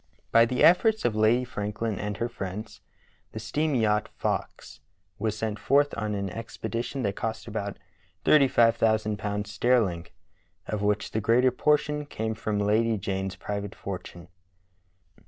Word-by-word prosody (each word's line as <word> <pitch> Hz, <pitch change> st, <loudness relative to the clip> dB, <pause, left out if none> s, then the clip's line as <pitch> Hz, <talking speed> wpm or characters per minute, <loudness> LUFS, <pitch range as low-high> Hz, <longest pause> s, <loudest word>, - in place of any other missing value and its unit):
B}^ 115 Hz, 0 st, +6 dB
the 125 Hz, -, +1 dB
efforts 215 Hz, +6 st, +5 dB
of 115 Hz, -, +1 dB
Lady 110 Hz, +3 st, +3 dB
Franklin 105 Hz, -2 st, -3 dB
and 105 Hz, -1 st, -3 dB
her 115 Hz, -, -1 dB
friends 105 Hz, -1 st, -7 dB, 0.5 s
the 110 Hz, -, -5 dB
steam 145 Hz, +7 st, -1 dB
yacht 105 Hz, -3 st, +1 dB
Fox -, -, -3 dB, 0.4 s
was 110 Hz, 0 st, -1 dB
sent 110 Hz, -1 st, -3 dB
forth 145 Hz, +5 st, +3 dB
on 105 Hz, -2 st, -2 dB
an 100 Hz, -2 st, -3 dB
ex 115 Hz, +2 st, -8 dB
pedition 120 Hz, +3 st, -3 dB
that 100 Hz, -2 st, -1 dB
cost 110 Hz, -1 st, -4 dB
about 100 Hz, -3 st, -4 dB, 0.5 s
thirty 145 Hz, -3 st, +6 dB
five 115 Hz, -2 st, +4 dB
thousand 110 Hz, -2 st, +1 dB
pounds 105 Hz, 0 st, -3 dB
sterling, 105 Hz, -8 st, +1 dB, 0.6 s
of 105 Hz, -1 st, -3 dB
which 105 Hz, +1 st, 0 dB
the 110 Hz, -, -1 dB
greater 125 Hz, +4 st, +4 dB
portion 150 Hz, +2 st, +1 dB
came 110 Hz, -4 st, -3 dB
from 110 Hz, -1 st, -2 dB
Lady 110 Hz, +2 st, +2 dB
Jane's 95 Hz, -1 st, -3 dB
private 100 Hz, -1 st, -5 dB
fortune. 90 Hz, -2 st, -7 dB
110 Hz, 155 wpm, -27 LUFS, 105-120 Hz, 0.6 s, B}^